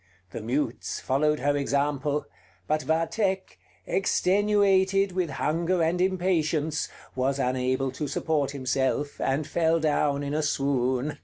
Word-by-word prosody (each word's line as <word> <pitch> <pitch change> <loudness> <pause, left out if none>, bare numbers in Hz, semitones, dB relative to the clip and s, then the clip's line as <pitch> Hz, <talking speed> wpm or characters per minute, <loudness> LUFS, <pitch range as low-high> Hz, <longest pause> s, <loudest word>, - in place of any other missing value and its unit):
The - - -6
mutes 120 +2 -2
followed 150 +2 +1
her 145 +1 +2
example: 145 +1 0 0.4
but 155 +5 +1
Vathek, 190 +5 -1 0.3
extenuated 195 0 +2
with 180 -2 -1
hunger 165 +5 0
and 170 +2 +1
impatience, 165 -5 0 0.3
was 130 +2 0
unable 130 0 0
to 145 +3 -4
support 145 0 0
himself, 140 +1 -1
and 140 +3 0
fell 165 +1 +1
down 145 -2 +1
in 140 0 -3
a 155 - +1
swoon. 135 -1 0
150 Hz, 125 wpm, -26 LUFS, 140-170 Hz, 0.4 s, her